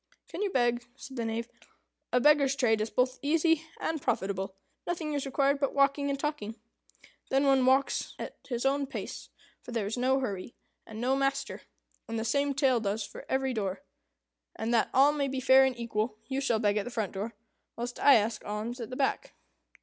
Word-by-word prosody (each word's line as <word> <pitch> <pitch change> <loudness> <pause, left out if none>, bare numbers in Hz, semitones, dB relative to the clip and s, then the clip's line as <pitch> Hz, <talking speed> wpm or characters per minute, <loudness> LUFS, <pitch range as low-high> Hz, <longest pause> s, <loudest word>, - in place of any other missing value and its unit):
"Can - - -5
you 415 - +1
beg?" 240 -5 +1
said 270 -1 -10
the 235 -2 -2
Knave. 225 +1 -2 0.6
"A 250 - +4
beggar's 280 0 +4
trade 225 -5 +2
is 215 - -1
both 255 +2 0
easy 325 +1 +2
and 320 -2 -2
profitable. 190 -2 -2 0.3
Nothing 330 -3 -2
is 280 -1 -2
required 275 +1 +2
but 275 - -1
walking 280 0 +3
and 275 -1 -1
talking. 275 -8 -3 0.7
Then 270 +1 +2
one 270 -1 +4
walks 265 +2 +2
at - - -6
his 240 0 -2
own 275 +1 +1
pace, 270 - -6 0.3
for - - -10
there 230 -4 -1
is 215 +4 -3
no 260 +2 +3
hurry, 205 -4 -4 0.3
and 220 0 -8
no 255 +3 +2
master, 275 0 -1 0.5
and 230 - -2
the 225 - -2
same 280 +4 +1
tale 265 -4 +3
does 205 0 -2
for 200 - -11
every 265 0 0
door. 195 -4 -3 0.7
And, 225 +2 -2
that 230 - +3
all 275 +3 +6
may 290 -2 -1
be 265 -1 -2
fair 265 +1 +6
and 260 -2 -1
equal, 225 -1 -2
you 270 0 -2
shall 240 -5 +2
beg 210 -1 +1
at 210 - 0
the - - -4
front 220 -5 -2
door, 205 +4 -5 0.4
whilst 245 +1 -5
I 285 - +7
ask 220 0 +1
an - - -12
alms 220 +4 -4
at 230 - -5
the 255 - -6
back." 285 - -1
255 Hz, 205 wpm, -29 LUFS, 225-275 Hz, 0.7 s, I